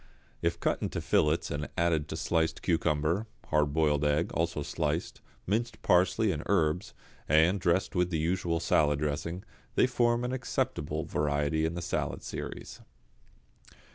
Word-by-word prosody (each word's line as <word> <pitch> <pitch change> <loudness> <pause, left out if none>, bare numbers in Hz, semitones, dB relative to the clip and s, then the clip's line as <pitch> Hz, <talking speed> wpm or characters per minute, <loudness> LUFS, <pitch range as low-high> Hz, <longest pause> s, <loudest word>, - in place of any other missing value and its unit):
If - - 0
cut - - 0
into - - -2
fillets 75 +2 +1
and 75 +1 -3
added 80 -3 +1
to 80 - -5
sliced 80 -1 0
cucumber, 85 +4 +1 0.2
hard 75 -2 +2
boiled 75 -1 +2
egg, 75 +3 +1
also 85 -2 -1
sliced, - - -2 0.2
minced 115 +5 -1
parsley 95 +4 +3
and 75 -4 -3
herbs, 85 -2 +1 0.3
and 80 +6 +4
dressed 90 +1 +1
with 90 -1 +1
the 85 - -1
usual 85 +1 0
salad 75 -3 +2
dressing, 75 +5 -3 0.3
they - - +5
form 120 -1 +1
an 125 +1 -2
acceptable 75 - -2
variety 75 +2 0
in 80 - -4
the 85 - -4
salad 90 - -2
series. - - -7
80 Hz, 145 wpm, -30 LUFS, 75-90 Hz, 0.3 s, they